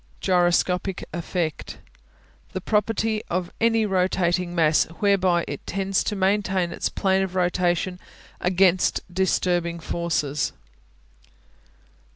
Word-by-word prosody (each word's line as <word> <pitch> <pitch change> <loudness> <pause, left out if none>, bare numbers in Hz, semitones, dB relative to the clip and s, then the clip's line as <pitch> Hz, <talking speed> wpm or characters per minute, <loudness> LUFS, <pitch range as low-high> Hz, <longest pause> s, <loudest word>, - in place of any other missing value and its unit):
Gyroscopic 180 +1 +1
Effect 170 -2 -3 0.8
The 185 - -2
property 215 +2 0
of 180 0 -2
any 225 -1 +3
rotating 180 -2 0
mass 155 -2 +4
whereby 190 -4 +2
it - - -7
tends 195 0 0
to 210 - -1
maintain 190 -2 +1
its - - -2
plane 190 -1 +1
of 190 -1 -3
rotation 180 0 0 0.4
against 185 0 +2
disturbing 175 -2 0
forces. 160 -5 -1
180 Hz, 100 wpm, -24 LUFS, 175-195 Hz, 0.8 s, mass